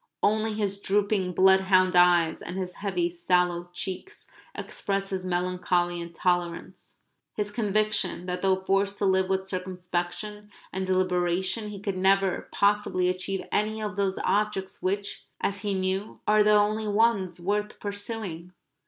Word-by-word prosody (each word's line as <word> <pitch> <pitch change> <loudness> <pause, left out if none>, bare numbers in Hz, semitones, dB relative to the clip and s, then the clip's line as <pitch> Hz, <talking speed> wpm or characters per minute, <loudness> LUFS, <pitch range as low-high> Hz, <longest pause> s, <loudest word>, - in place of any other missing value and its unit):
Only 215 +1 +2
his 200 -2 -2
drooping 200 -2 +1
bloodhound 190 0 +4
eyes 175 -2 +4
and 180 - -6
his 185 -1 -3
heavy 185 -4 -1
sallow 175 0 0
cheeks 190 - -7 0.2
expressed 195 0 -3
his 185 -1 -3
melancholy 175 -1 0
tolerance, 175 0 -2 0.4
his 205 -1 -2
conviction 215 -4 0
that 180 0 -3
though 190 -1 +3
forced 195 +1 0
to 205 - 0
live 190 -1 +2
with 190 0 0
circumspection 185 +3 -4 0.2
and 190 0 -2
deliberation 185 +3 0
he 205 -1 -7
could 200 -1 -3
never 195 0 +2
possibly 200 -3 +2
achieve 185 +1 -3
any 215 +1 0
of 210 -3 -4
those 195 -1 0
objects 205 -2 -1
which, 200 +2 -2
as 200 0 -1
he 205 -2 -1
knew, 190 +2 -2
are 210 0 +5
the 210 0 +5
only 210 +1 +2
ones 205 -4 +2
worth 205 +4 -2
pursuing. 200 -4 -5
190 Hz, 140 wpm, -27 LUFS, 180-205 Hz, 0.4 s, are